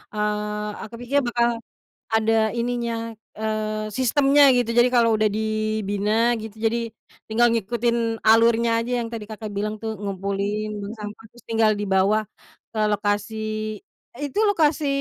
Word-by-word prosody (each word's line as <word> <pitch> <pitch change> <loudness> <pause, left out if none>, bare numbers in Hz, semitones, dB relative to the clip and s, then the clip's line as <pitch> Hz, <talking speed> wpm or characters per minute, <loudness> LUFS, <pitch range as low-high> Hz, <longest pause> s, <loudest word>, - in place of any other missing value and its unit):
eee, 210 0 -2
aku 230 - -9
pikir 275 +4 +2
bakal 235 -1 +1 0.5
ada 220 0 +2
ininya, 235 -1 -2 0.2
eee, 215 0 -2
sistemnya 275 +5 +3
gitu. 245 -2 +1
Jadi, 240 +1 +6
kalau 230 -3 +4
udah 215 - +1
dibina 215 +1 0
gitu, 220 -1 -8
jadi, 230 0 -1 0.3
tinggal 235 +2 +3
ngikutin 230 +1 -1
alurnya 230 +1 +4
aja 245 0 -1
yang 230 - -4
tadi 225 -2 -6
Kakak 215 +1 -7
bilang 210 +1 -3
tuh, 220 -1 -4
ngumpulin 200 +1 -3
bank 205 0 -6
sampah, 210 +1 -8
terus 240 - -19
tinggal 225 -1 +3
dibawa 205 +1 +1 0.4
ke 225 - -7
lokasi. 215 +1 -2 0.4
Itu 290 +6 -3
lokasi, 315 -7 +2
220 Hz, 135 wpm, -23 LUFS, 210-235 Hz, 0.5 s, Jadi